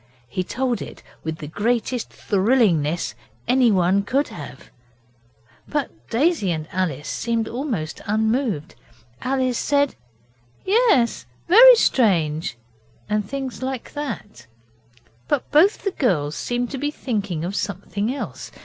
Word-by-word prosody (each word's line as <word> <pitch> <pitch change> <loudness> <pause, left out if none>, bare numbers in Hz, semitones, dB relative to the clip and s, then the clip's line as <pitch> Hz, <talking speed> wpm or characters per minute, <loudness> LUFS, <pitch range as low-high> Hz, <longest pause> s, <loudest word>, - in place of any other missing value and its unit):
He 185 +10 -2
told 245 +5 -1
it - - -9 0.2
with 160 0 -3
the 150 - -7
greatest 230 - -1
thrillingness 190 - +1 0.3
anyone 200 -7 +4
could 275 +8 0
have, 140 -2 -10 1.0
but 295 -3 -1 0.2
Daisy 275 - +2
and 155 -2 -3
Alice 160 -6 -2
seemed 230 -1 -1
almost 230 - -4
unmoved. 220 - 0 0.5
Alice 255 -2 0
said 285 -1 +2 0.7
'Yes, 385 - +3 0.2
very 485 +7 +10
strange,' 165 - +2 0.5
and 210 0 0
things 270 -2 -5
like 260 -2 -4
that, 260 - -6 0.8
but 290 - -1
both 335 +8 +4
the 395 - 0
girls 155 - 0
seemed 245 0 -2
to 270 - -4
be 290 +2 0
thinking 205 - -3
of 190 +3 -4
something 200 +3 -2
else. 275 - -6
230 Hz, 120 wpm, -22 LUFS, 185-265 Hz, 1.0 s, very